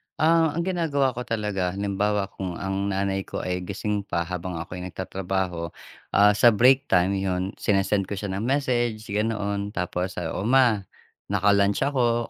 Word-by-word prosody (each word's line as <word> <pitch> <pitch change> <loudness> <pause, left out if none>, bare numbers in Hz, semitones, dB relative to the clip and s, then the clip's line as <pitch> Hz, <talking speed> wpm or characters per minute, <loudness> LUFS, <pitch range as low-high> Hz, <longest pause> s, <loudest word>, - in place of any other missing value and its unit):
Ah, 160 -1 +3
ang 170 - 0
ginagawa 160 -7 +1
ko 125 +1 -6
talaga, 100 -5 -1
halimbawa 100 0 -1
kung 90 -3 -5
ang 95 +1 -2
nanay 95 0 -1
ko - - -5
ay 90 0 -2
gising 105 +1 -2
pa 85 0 0
habang 90 0 -5
ako'y 90 +2 -6
nagtatrabaho. 90 -1 -3 0.5
Ah, 105 +1 +7
sa 110 +2 +5
break 130 +5 +5
time 95 +2 +2
'yon, 95 0 -1
sine-send 100 -1 +1
ko 100 - -4
siya 95 0 -4
ng 100 +3 -3
message, 120 -5 0
ganoon. 105 -1 -1
Tapos, 90 +1 -2
ah, 80 -2 -3
"O, 100 - -3
Ma, 125 -4 +4 0.5
naka 100 0 +2
lunch 100 +4 +2
ako, 120 -4 +1
100 Hz, 165 wpm, -25 LUFS, 95-115 Hz, 0.5 s, Ah